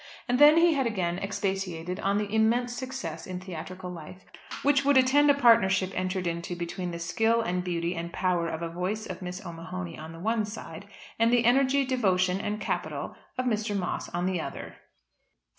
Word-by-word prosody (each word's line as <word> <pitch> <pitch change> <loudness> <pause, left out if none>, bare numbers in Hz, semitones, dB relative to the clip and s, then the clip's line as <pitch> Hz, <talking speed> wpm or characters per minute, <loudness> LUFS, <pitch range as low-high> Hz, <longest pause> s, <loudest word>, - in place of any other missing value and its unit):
And 250 0 +1
then 295 +2 +8
he 335 0 +5
had 270 -4 +1
again 180 -5 -1
expatiated 190 -3 -3
on 200 0 +1
the 210 0 -2
immense 240 +3 +2
success 250 - -5
in 185 -1 -5
theatrical 185 0 -7
life 175 +2 -10 0.4
which 280 0 +4
would 280 0 +4
attend 275 +3 +5
a 285 - +6
partnership 195 -8 +4
entered 185 0 -2
into 170 +1 -3
between 175 +1 -4
the 170 - -5
skill 225 +8 +1
and 180 -5 -1
beauty 170 -1 -1
and 170 0 -5
power 180 -2 0
of 165 0 -4
voice 195 +5 -2
of - - -7
Miss 180 +2 -6
O'Mahony 170 0 -6
on 160 +1 -8
the 165 - -10
one 220 +4 0
side, 200 -3 -8 0.3
and 230 +1 +4
the 240 -1 +3
energy, 270 +3 +4
devotion, 190 -7 +1
and 210 0 -3
capital - - -3 0.2
of 255 - -1
Mr. 215 -3 0
Moss 180 -2 -3
on 175 +1 -2
the 185 -3 0
other. - - -7
190 Hz, 185 wpm, -28 LUFS, 175-230 Hz, 0.4 s, then